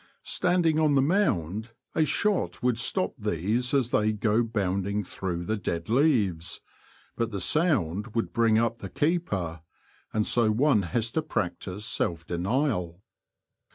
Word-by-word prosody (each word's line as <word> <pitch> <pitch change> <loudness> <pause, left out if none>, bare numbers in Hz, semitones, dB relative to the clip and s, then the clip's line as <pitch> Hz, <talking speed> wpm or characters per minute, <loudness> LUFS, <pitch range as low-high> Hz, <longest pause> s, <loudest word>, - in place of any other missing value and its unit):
Standing 175 -3 +1
on 150 -2 +3
the 135 - +5
mound 110 - 0 0.2
a 155 - +2
shot 205 -5 0
would 125 -2 +2
stop 185 +8 0
these 105 +5 -1
as 130 -4 +1
they 105 +1 +2
go 105 +2 +1
bounding 100 -2 -1
through 90 -2 -4
the 110 +4 -1
dead 85 -3 -4
leaves, 110 - +1 0.6
but 115 -1 -1
the 100 -3 -4
sound 110 - +2
would 115 - -1
bring 115 -2 +3
up 115 0 0
the 100 - -7
keeper, 95 - -1 0.5
and 110 -1 0
so 115 -3 +3
one 115 +1 +3
has 110 +6 -1
to 160 - 0
practise 100 - -3
self 85 -5 -1
denial. 90 - -1
110 Hz, 145 wpm, -27 LUFS, 95-135 Hz, 0.6 s, the